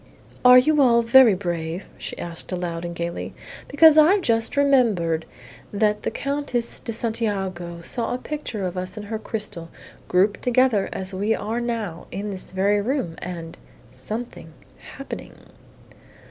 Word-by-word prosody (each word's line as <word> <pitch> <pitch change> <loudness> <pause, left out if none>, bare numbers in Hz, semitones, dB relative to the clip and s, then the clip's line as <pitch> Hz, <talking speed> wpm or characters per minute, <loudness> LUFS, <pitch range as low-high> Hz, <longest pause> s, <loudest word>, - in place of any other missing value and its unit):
"Are 250 0 +9
you 295 +3 +4
all 235 -3 +5
very 235 -2 +7
brave?" 175 -1 -4
she - - -6
asked 170 +1 -6
aloud 175 -2 -3
and 170 0 -5
gaily. 170 0 -5 0.3
"Because 310 +1 +7
I've 365 +6 +5
just 225 +2 0
remembered 220 - +2 0.4
that 210 0 +1
the - - -1
Countess 275 -4 -2
de 230 - -5
Santiago 195 -7 -2
saw 230 +7 -2
a 245 - -1
picture 255 -8 -5
of 180 0 -4
us 185 +4 -6
in 210 - -5
her 215 +1 -4
crystal, 210 -7 -4 0.4
grouped 195 +3 +2
together 250 -4 +2
as 190 0 -3
we 205 +4 0
are 230 +3 -3
now, 225 -8 -4
in 205 +1 -5
this 190 -1 -7
very 200 +2 +2
room, 235 - -2
and 170 -2 -7 0.3
something 220 -7 -7 0.4
happening." 275 - -8
210 Hz, 145 wpm, -23 LUFS, 180-245 Hz, 0.4 s, Are